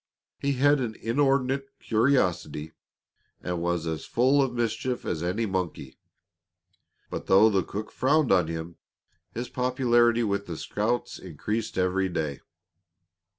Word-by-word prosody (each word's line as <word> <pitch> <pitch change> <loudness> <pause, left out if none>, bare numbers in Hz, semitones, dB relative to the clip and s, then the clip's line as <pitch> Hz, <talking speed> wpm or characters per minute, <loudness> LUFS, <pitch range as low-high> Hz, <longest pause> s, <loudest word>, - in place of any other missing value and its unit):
He 140 0 0
had 145 +2 +4
an 115 -4 -3
inordinate 135 +2 +1
curiosity 95 - +1 0.7
and 90 -1 -3
was 85 -1 -1
as 80 -1 -3
full 130 +4 +3
of 135 -2 +1
mischief 120 +1 -2
as 80 - -2
any 90 +7 -1
monkey. 90 -9 -4 1.1
But - - -5
though 105 +3 +6
the 95 -2 +2
cook 105 +5 -6
frowned 145 +1 +2
on 90 -4 +4
him, 80 +1 -6 0.5
his 120 +2 -4
popularity 120 -2 +2
with 100 -1 -1
the 85 -2 -5
scouts 110 +8 -2
increased 105 +6 -4
with 90 - +2
every 95 +1 0
day. 75 -5 -3
110 Hz, 135 wpm, -27 LUFS, 90-125 Hz, 1.1 s, though